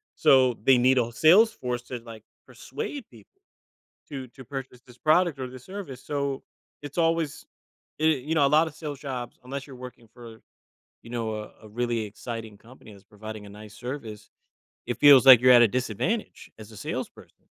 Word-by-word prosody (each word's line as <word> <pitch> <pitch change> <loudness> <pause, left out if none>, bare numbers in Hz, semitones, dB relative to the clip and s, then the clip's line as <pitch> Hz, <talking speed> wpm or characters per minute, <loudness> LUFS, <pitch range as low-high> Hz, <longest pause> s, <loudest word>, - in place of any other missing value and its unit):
So 130 -3 +4
they 130 -1 +5
need 130 +2 +3
a 120 -1 +1
sales 190 - +5
force 125 - -4
to, 125 -1 -7
like, 110 -2 -11 0.2
persuade 295 - -7
people 390 - -20 0.7
to 135 -3 -7
to 130 +1 -13
purchase 135 -2 -8
this 125 0 -16
product 160 -1 +2
or 130 - -4
this 130 0 -12
service. 185 -10 -8
So, 140 -2 -3 0.4
it's 145 +3 -10
always 165 -3 0 0.5
eh, 155 - +1 0.2
you 160 - +1
know, 145 -2 +4
a - - 0
lot 160 +1 +3
of 150 - -10
sales 150 -4 -7
jobs 125 -4 -6
unless 135 +2 -6
you're 135 - -11
working 120 -2 -18
for, 115 -2 -13 0.6
you 115 - -13
know, 120 -1 -3
a 105 0 -7
a 110 - -12
really 120 +1 -2
exciting 110 0 -8
company 115 -2 -16
that's 100 -1 -17
providing 110 0 -9
a - - -12
nice 105 +1 -12
service, 120 -5 -8 0.6
it 120 -1 -3
feels 140 -3 +8
like 130 -3 +10
you're 125 0 +6
at - - +6
a - - +5
disadvantage 175 - -4
as 110 +1 -12
a 110 - -13
salesperson. - - -7
125 Hz, 190 wpm, -26 LUFS, 115-145 Hz, 0.7 s, like